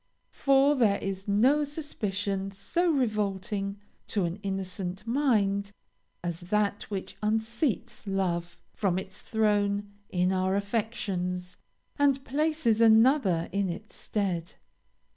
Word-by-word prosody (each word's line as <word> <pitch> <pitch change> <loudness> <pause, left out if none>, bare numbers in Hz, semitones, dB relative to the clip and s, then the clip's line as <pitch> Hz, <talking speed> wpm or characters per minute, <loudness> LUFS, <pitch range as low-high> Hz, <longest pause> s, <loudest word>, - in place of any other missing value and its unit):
For 275 +1 +4
there 225 -8 +3
is 195 0 -5
no 250 +9 +4
suspicion 205 -10 -2
so 335 - 0
revolting 205 - -1 0.3
to 200 -4 0
an 170 +2 -3
innocent 190 0 -4
mind 210 -6 +1 0.5
as 175 -1 -3
that 205 +3 -1
which 195 -3 -5
unseats 225 +1 -1
love 175 -3 -1
from 190 -4 0
his 190 +1 -6
throne 205 -2 +1 0.2
in 180 0 +1
our 185 +1 +1
affections, 195 -4 -2 0.4
and 275 -1 +3
places 290 -6 +1
another 225 - +5
in 200 0 0
his 205 +5 -6
stead. 185 -5 -2
205 Hz, 110 wpm, -28 LUFS, 190-230 Hz, 0.5 s, another